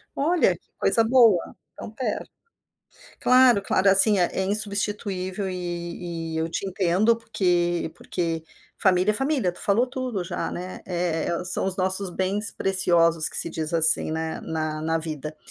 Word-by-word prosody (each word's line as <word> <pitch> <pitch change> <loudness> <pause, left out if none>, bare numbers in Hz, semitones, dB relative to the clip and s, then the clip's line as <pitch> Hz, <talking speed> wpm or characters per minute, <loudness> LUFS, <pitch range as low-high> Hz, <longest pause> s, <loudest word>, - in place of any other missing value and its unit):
Olha, 330 +5 +2
que - - -37
coisa 230 - +2
boa. 225 -6 +3 0.2
Tão - - -9
perto. 250 +4 -4 0.9
Claro, 250 -4 +5
claro, 195 0 +2
assim, 195 +1 +5
é 175 - +4
é 190 - -1
insubstituível, 200 -1 -3
e 170 -2 -5
e, - - -3
eu 160 0 -1
te 165 - -4
entendo, 190 +5 +1
porque 175 -7 -1
porque 165 -2 -4 0.3
família 185 -1 +2
é - - 0
família, 270 -5 0
tu 175 - -13
falou 210 +5 +2
tudo 250 -6 -4
já, 175 +1 -4
né, 180 +1 -7
eh, 175 -2 -2 0.2
são 185 +1 -1
os 190 -1 -3
nossos 190 +1 -1
bens 195 +4 -1
preciosos, 170 -4 +2
que - - -7
se 170 - -1
diz 160 0 -4
assim, 160 -1 +7
né, 160 0 -4
na 155 -1 -3
na 160 +1 -1
vida. 155 -1 -6
185 Hz, 160 wpm, -24 LUFS, 170-210 Hz, 0.9 s, assim